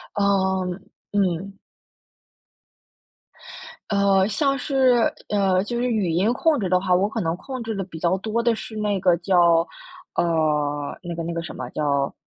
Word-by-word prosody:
哦， 190 -2 +1 0.5
嗯。 195 0 -1 2.3
呃， 200 -1 +3
像 275 +5 +1
是， 260 -4 +2 0.2
呃， 195 -2 +2
就 240 +2 -4
是 245 +1 0
语 205 -7 0
音 195 +8 +2
控 300 0 +1
制 190 - -1
的 180 0 +3
话， 185 -1 +2
我 195 +3 +2
可 225 +1 -3
能 165 +1 -1
控 260 +5 -7
制 225 -1 -4
的 195 - -2
比 170 -3 -9
较 175 +3 +1
多 220 +3 -2
的 235 -1 +2
是 220 0 -8
那 205 -3 -1
个 180 -2 +4
叫 170 -2 +3 0.5
呃， 150 -3 0
那 175 - -5
个 165 - -4
那 170 0 -4
个 170 - -3
什 170 - -7
么， 125 -1 -5
叫 140 -2 0
190 Hz, 175 characters per minute, -23 LUFS, 170-215 Hz, 2.3 s, 个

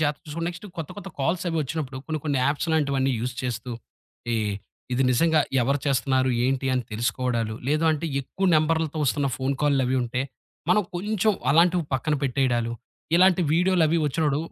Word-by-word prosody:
జాగ్రత్త 150 -1 0
చూసుకోండి. 165 +3 -4
నెక్స్ట్ 175 +4 -10
కొత్త 160 - -4
కొత్త 200 - -8
కాల్స్ 165 +7 0
అవి 165 - -2
వచ్చినప్పుడు, 135 -2 -4
కొన్ని 155 -1 -2
కొన్ని 145 -3 0
యాప్స్‌ 145 +4 -1
లాంటివన్నీ 140 -4 +1
యూజ్ 125 +1 -3
చేస్తూ, 125 -1 -4 0.6
ఈ - - +1 0.6
ఇది 125 +2 +2
నిజంగా 160 +5 +3 0.2
ఎవరు 140 +4 +1
చేస్తున్నారు? 130 -1 +2
ఏంటి? 135 +1 0
అని 125 - 0
తెలుసుకోవడాలు, 120 0 -1
లేదు 155 +3 +2
అంటే 155 +1 -1
ఎక్కువ 190 +8 -2
నంబర్‌లతో 160 0 +1
వస్తున్న 140 +2 +1
ఫోన్‌కాల్‌లవి 135 -1 +1
ఉంటే, 125 +2 -2 0.5
మనం 210 +3 +4
కొంచెం 210 +3 +1 0.2
అలాంటివి 170 +2 +4
పక్కన 150 +4 0
పెట్టేయడాలు, 120 -3 0 0.4
ఇలాంటి 185 0 +5
వీడియోలవి 170 -1 +3
వచ్చినప్పుడు 145 -1 +1
145 Hz, 155 wpm, -25 LUFS, 130-165 Hz, 0.6 s, ఇలాంటి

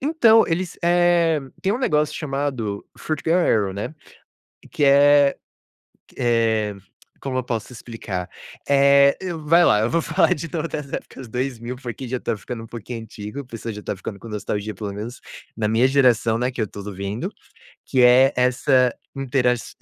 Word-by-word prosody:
então 240 -7 +5
eles, 175 +1 -2
eh, 175 -2 +3 0.2
tem 195 +1 +1
um 235 - -1
negócio 150 - +1
chamado 135 -8 -3
foot 155 -2 -4
girls 170 +2 +3 0.2
erin, 95 - -7
né, 105 +10 -5 0.8
que 145 - 0
é 140 0 +5 0.8
eh, 115 -3 +1 0.5
como 130 -2 -3
eu 130 - -1
posso 115 -1 -4
explicar? 105 -6 -6 0.4
Eh, 140 0 +5
eu 175 -4 -5
vai 170 +3 +5
lá, 105 - +4
eu 110 - +1
vou 165 +4 +1
falar 155 0 +2
de 165 +3 -6
todas 155 -1 -4
as 135 - -15
épocas 130 - -7
2000, 125 0 -4
porque 125 0 -7
já 125 +1 -3
tá - - -2
ficando 115 +3 -7
um - - -11
pouquinho 115 +1 -7
antigo, 110 +3 -8
a - - -14
pessoa 115 -2 -6
já 105 - -8
tá - - -3
ficando 100 +1 -7
com 115 - -11
nostalgia, 105 0 -4
pelo 100 +1 -5
menos 110 +5 -7 0.4
na 110 -2 -1
minha 115 +4 +3
geração, 125 -4 +3
né, 125 +2 0
que 125 - -4
eu 110 - 0
tô 100 - -9
vivendo. 100 - -4 0.6
Que 130 -2 +2
é 125 +3 +6
essa 125 0 +3 0.2
interaç 125 -3 0
125 Hz, 175 wpm, -22 LUFS, 110-145 Hz, 0.8 s, é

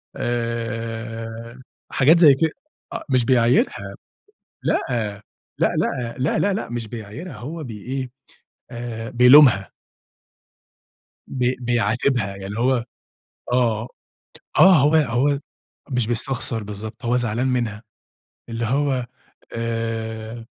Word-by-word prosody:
آآ، 115 0 -4 0.3
حاجات 155 +6 +5
زي 155 -5 +8
ك 135 - -4 0.5
أ - - -4
مش 130 -3 +2
بيعايرها 125 - +2 0.7
لأ، - - +1
لأ، 105 -4 -2 0.5
لأ، 120 -2 -1
لأ، 130 +4 +1
لأ، 200 - +2
لأ، 200 - -3
مش 120 -2 -4
بيعايرها 115 - -8
هو 150 +9 -6
بي 110 -5 -8
إيه 130 +1 -4 0.6
آآ 115 -1 -6
بيلومها. 125 -4 +6 1.5
بي 125 0 0
بيعاتبها، 120 0 +1
يعني 100 -1 -8
اللي 100 +3 -5
هو 125 -1 +2 0.7
آه، 120 -2 +1 0.7
آه، 190 +1 +8
هو 150 +1 +4
هو 140 -1 +2 0.5
مش 125 -3 +1
بيستخسر 120 -1 -1
بالضبط 110 +3 -8
هو 120 +1 +2
زعلان 120 +1 0
منها، 120 -4 -1 0.7
اللي 115 0 -3
هو 130 +1 0 0.5
آآ، 115 0 -4
120 Hz, 110 wpm, -22 LUFS, 115-130 Hz, 1.5 s, زي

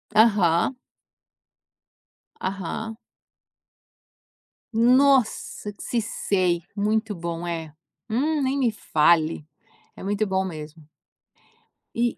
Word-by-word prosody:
Aham. 205 -1 +4 1.7
Aham. 200 +4 -4 1.8
Nossa, 250 -3 +3
que - - -11
se 235 -2 0
sei. 180 -5 0
Muito 215 +1 0
bom, 170 -1 -5
é. 165 -3 -4 0.4
Hum, 290 +6 +1
nem 270 +1 0
me 245 -4 +2
fale. 160 -5 +2 0.5
É - - -11
muito 205 +2 0
bom 190 0 0
mesmo. 155 -2 -8 1.1
E 240 0 0
205 Hz, 90 wpm, -24 LUFS, 170-230 Hz, 1.8 s, Aham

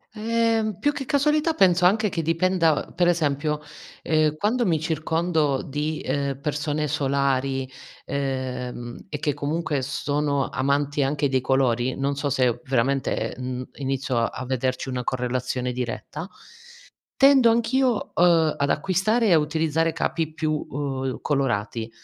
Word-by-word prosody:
Ehm, 225 -1 0
più 290 - +1
che 285 -2 -5
casualità 300 +3 +2
penso 180 -2 +4
anche 210 +3 +3
che 170 - -2
dipenda 165 -1 +2
uhm, - - -17
per 175 0 +2
esempio, 150 -3 0 0.4
ehm, 155 -1 +2
quando 230 +6 +1
mi 165 -7 +1
circondo 160 -2 0
di, 150 +2 -3
ehm, 140 -1 -2
persone 150 +1 -2
solari, 135 -1 0 0.4
ehm, 125 -3 -4
e 150 - -3
che 145 0 -1
comunque 150 0 -2
s 135 +2 -4
sono 145 -1 0
amanti 140 +2 0
anche 140 +1 +1
dei 130 -1 +1
colori, 130 -1 +1
non 140 +1 -1
so 140 0 -2
se 125 -3 +1
veramente, 135 +1 0
mhmm, 125 0 -4
inizio 135 -3 -1
a 125 +2 -2
vederci 130 0 -2
una 125 -1 -3
correlazione 125 0 -2
diretta, 125 - -5 0.9
tendo 270 -3 +6
anch'io, 235 +1 +1
uhm, 165 -3 +4
ad 140 0 0
acquistare 195 +8 +1
e - - +3
a 160 - +6
utilizzare 160 +1 0
capi 160 -1 -2
più, 155 -1 -1 0.2
uhm, 135 -2 -3
colorati. 115 -5 -1
145 Hz, 140 wpm, -24 LUFS, 130-170 Hz, 0.9 s, tendo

